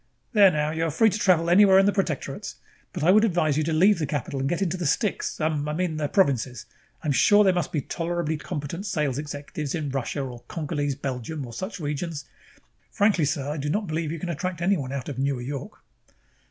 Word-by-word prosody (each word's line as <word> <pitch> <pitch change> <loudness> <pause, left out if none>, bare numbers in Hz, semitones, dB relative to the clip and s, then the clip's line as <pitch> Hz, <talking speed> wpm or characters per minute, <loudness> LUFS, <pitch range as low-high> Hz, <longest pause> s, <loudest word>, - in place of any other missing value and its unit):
"There, 205 -3 +7
now, 150 -2 0
you 160 +1 -1
are - - 0
free 215 +8 +3
to 210 - -3
travel 175 -5 +3
anywhere 190 +2 +6
in 195 - +6
the 205 - +4
Protectorates. 175 -8 -3 0.4
But - - -4
I 175 - +6
would 215 +3 +5
advise 175 -8 +2
you 155 - +1
to 165 - -1
leave 185 +5 +4
the 155 - -1
capital 140 -1 -3
and 135 +1 -1
get 175 - -1
into 185 -1 -1
the 175 -4 -2
sticks 205 - -1
um, 155 -2 -1
I - - -2
mean 165 -1 -1
the 150 -1 -1
provinces. 130 - +1 0.4
I - - -4
am - - +2
sure 205 +9 +5
there 190 -2 +4
must 175 -1 -1
be 150 - -1
tolerably 165 +2 -2
competent 170 +5 -5
sales 150 -7 -1
executives 145 0 -5
in 150 -4 -3
Russia 135 +2 -2
or 125 -2 -7
Congolese 145 -3 -2
Belgium 135 +2 -4
or 120 - -10
such 190 - -5
regions. 150 0 -4 0.6
Frankly, 200 -6 +2
sir, 140 -1 -2
I 150 +2 -3
do 145 0 -3
not 205 +7 0
believe 155 -2 -2
you 165 - -4
can 175 +2 -5
attract 175 +2 -3
anyone 170 -7 0
out 140 -2 -4
of 135 -3 -5
Newer 135 -2 0
York." 140 +1 -7
155 Hz, 225 wpm, -25 LUFS, 145-180 Hz, 0.6 s, There